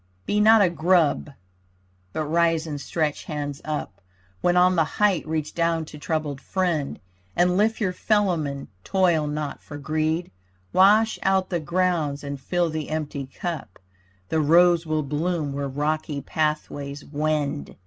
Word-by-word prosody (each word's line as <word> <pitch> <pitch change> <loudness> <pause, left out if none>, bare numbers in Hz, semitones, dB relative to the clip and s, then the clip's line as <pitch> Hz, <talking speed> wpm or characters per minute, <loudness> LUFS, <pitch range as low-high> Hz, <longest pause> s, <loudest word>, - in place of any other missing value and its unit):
Be 210 - +1
not 220 0 +7
a 185 - +4
grub 165 -2 +2 0.8
but 155 - -2
rise 165 +1 +2
and 145 -3 -5
stretch 155 -2 -2
hands 145 -2 -4
up 150 -10 -4 0.4
When 175 0 +3
on 180 +1 +5
the 165 - +4
height 200 -6 +2
reach 155 -1 -2
down 165 -1 0
to 150 -1 -11
troubled 150 -2 -2
friend, 170 -6 -1 0.4
And 180 +1 +3
lift 220 +3 +2
your 190 -5 0
fellowmen, 175 -10 0 0.2
toil 175 -5 +2
not 150 0 -4
for 145 - -9
greed. 155 +3 -1 0.4
Wash 210 +4 +5
out 190 -1 +1
the 175 - +1
grounds 165 -4 0
and 140 -1 -5
fill 175 +4 0
the 155 -1 -4
empty 150 -3 -3
cup. 160 - -6 0.5
The 160 - +1
rose 170 +2 +5
will 155 -1 0
bloom 150 +1 -1
where 140 0 -2
rocky 150 +1 -2
pathways 145 -1 -3
wend. 150 -1 -2
155 Hz, 150 wpm, -24 LUFS, 145-180 Hz, 0.8 s, not